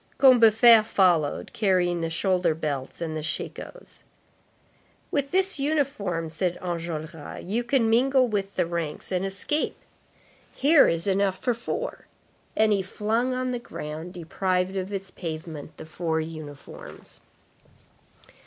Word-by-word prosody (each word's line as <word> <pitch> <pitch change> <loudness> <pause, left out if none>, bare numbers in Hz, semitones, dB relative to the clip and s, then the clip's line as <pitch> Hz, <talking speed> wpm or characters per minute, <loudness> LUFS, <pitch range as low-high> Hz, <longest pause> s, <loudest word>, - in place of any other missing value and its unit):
Combeferre 235 -3 +7
followed, 175 -8 +1
carrying 180 -4 +1
the 165 - -1
shoulder 180 -1 +1
belts 145 -2 -4
and 160 -2 -3
the 155 - -3
shakos. - - -7 1.1
"With 280 -2 0
this 380 -1 +3
uniform," 265 - -1
said 175 +1 -1
Enjolras, 165 -3 -5
"you 220 +7 -1
can 240 -1 +2
mingle 255 +3 +4
with 200 -3 -3
the - - +1
ranks 170 -1 -4
and 185 0 0
escape; 195 +11 -1 0.8
here 290 +2 +6
is 165 0 0
enough 195 -1 +1
for 245 - 0
four." 240 - -5 0.5
And 215 -1 +4
he 200 - +1
flung 225 +6 -1
on 255 0 -1
the 245 - -2
ground, 160 -6 -7
deprived 180 +2 -1
of 190 +1 -3
its 195 -2 -5
pavement, 160 -3 -7
the - - -9
four 160 0 -2
uniforms. 155 -3 -9
190 Hz, 130 wpm, -26 LUFS, 165-235 Hz, 1.1 s, Combeferre